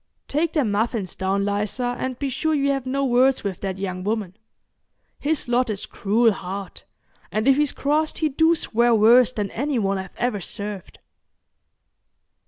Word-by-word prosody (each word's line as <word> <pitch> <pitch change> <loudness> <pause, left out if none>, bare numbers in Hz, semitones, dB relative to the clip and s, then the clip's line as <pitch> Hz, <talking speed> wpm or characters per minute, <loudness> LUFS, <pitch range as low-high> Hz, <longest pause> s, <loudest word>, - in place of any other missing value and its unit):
Take 315 +3 0
them 280 -10 +1
muffins 210 -2 -1
down, 195 +1 -1
Liza, 210 +5 -1
and 260 -1 -3
be 280 - -2
sure 310 +4 0
you 280 -1 +2
have 270 -2 -2
no 275 +1 0
words 255 +1 +3
with 195 -3 -3
that 195 -1 -3
young 185 -2 -4
woman. 205 -3 -2 0.8
His 300 -2 -1
lot 245 0 +1
is 205 -2 -3
cruel 225 +3 +2
hard, 195 0 -6 0.5
and 215 +3 -1
if 270 - +6
he's 295 -2 +2
crossed 305 +2 0
he 315 - +1
do 320 +4 +3
swear 235 -5 +2
worse 235 +3 +6
than 210 -5 -3
any 280 +3 -1
one 195 -3 0
I've 190 -1 -8
ever 240 -4 -1
served." 200 0 -6
235 Hz, 170 wpm, -23 LUFS, 200-275 Hz, 0.8 s, if